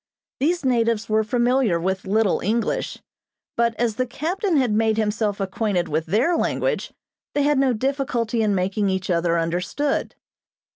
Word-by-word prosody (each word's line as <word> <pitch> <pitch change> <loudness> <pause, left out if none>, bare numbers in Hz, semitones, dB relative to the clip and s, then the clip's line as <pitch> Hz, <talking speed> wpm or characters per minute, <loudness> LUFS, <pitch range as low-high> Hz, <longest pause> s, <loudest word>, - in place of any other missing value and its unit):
These 335 +2 0
natives 230 -4 +1
were 215 0 +3
familiar 240 -4 +2
with 190 +3 -2
little 210 0 +2
English, 225 +3 -1 0.6
but 235 -1 +1
as 230 -2 -1
the 255 - 0
captain 335 - -1
had 255 -5 +2
made 220 +1 +2
himself 210 -1 0
acquainted 195 -2 -1
with 155 +2 -2
their 235 - +2
language - - -1 0.4
they 290 - +2
had 290 -1 +3
no 270 -1 +3
difficulty 245 -2 -1
in 210 -2 +2
making 195 +2 0
each 190 -1 -1
other 170 0 +1
understood. 180 - -1
225 Hz, 150 wpm, -23 LUFS, 195-260 Hz, 0.6 s, were